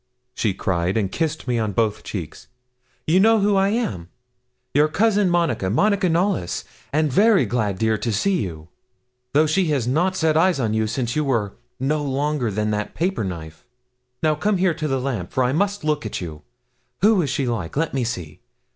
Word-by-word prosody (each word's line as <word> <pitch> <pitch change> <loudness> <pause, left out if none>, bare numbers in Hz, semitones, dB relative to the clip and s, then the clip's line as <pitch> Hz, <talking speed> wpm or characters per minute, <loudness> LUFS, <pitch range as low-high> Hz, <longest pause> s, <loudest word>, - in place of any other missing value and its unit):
she 110 - 0
cried, 90 +1 -1
and 100 -4 0
kissed 160 - -2
me 120 -2 +1
on 110 -2 -1
both 110 0 0
cheeks. 90 -7 -7 0.6
'You 170 +4 +3
know 225 +2 +5
who 205 0 +2
I 195 0 +3
am? 105 - -2 0.6
Your 150 +2 +4
cousin 205 +3 +2
Monica 165 - +1
Monica 195 - +2
Knollys 170 - 0 0.3
and 150 -1 +1
very 215 - +5
glad, 105 -6 -1
dear, 110 +1 +1
to 115 - -1
see 185 - +1
you, 80 -5 -6 0.6
though 150 +3 +5
she 165 +5 +2
has 140 -6 0
not 175 +9 +1
set 160 -3 +1
eyes 175 -1 +3
on 110 -4 0
you 110 0 +1
since 120 +1 -2
you 150 - +1
were 115 -8 0 0.3
no 150 +4 0
longer 140 -2 -1
than 105 +1 -1
that 105 0 -3
paper 185 - -1
knife. 80 -4 -7 0.6
Now 155 -1 +4
come 205 +7 0
here 180 -1 +2
to 155 -1 -3
the 135 -2 0
lamp, 125 -9 -3
for 130 - +2
I 125 +1 +1
must 200 +4 0
look 150 -1 0
at 110 - -4
you. 80 -4 -7 0.6
Who 210 -1 +5
is 145 - -1
she 135 - -1
like? 115 -5 -3
Let 165 +1 0
me 135 -2 0
see. 90 -10 -5
135 Hz, 195 wpm, -22 LUFS, 105-175 Hz, 0.6 s, know